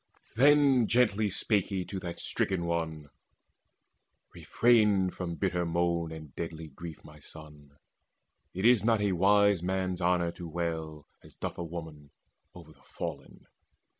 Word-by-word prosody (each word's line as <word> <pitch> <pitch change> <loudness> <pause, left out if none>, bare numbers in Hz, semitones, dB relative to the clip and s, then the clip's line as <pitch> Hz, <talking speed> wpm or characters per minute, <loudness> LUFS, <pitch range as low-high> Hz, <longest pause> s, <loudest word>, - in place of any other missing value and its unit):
Then 135 -2 +5
gently 110 -3 +2
spake 100 0 0
he 95 -3 -3
to 95 - -5
that 85 -2 -6
stricken 90 -3 -1
one: 80 -3 -3 1.2
"Refrain 105 -6 +3
from 85 -2 -5
bitter 90 -1 -1
moan 85 -1 -1
and 80 -3 -10
deadly 80 -1 -6
grief, 80 +3 -10
My 75 0 -14
son. 75 -1 -14 0.7
It 95 +3 -3
is 120 -4 +5
not 115 -1 +3
for 105 - 0
a 100 - +1
wise 100 +1 +3
man's 95 0 -2
honour 85 -1 +1
To 85 0 -9
wail, 80 -2 -4 0.2
as - - -16
doth - - -5
a - - -2
woman, 80 -3 -8 0.5
o'er 80 -3 -13
the - - -27
fallen. - - -8
85 Hz, 145 wpm, -29 LUFS, 80-100 Hz, 1.2 s, Then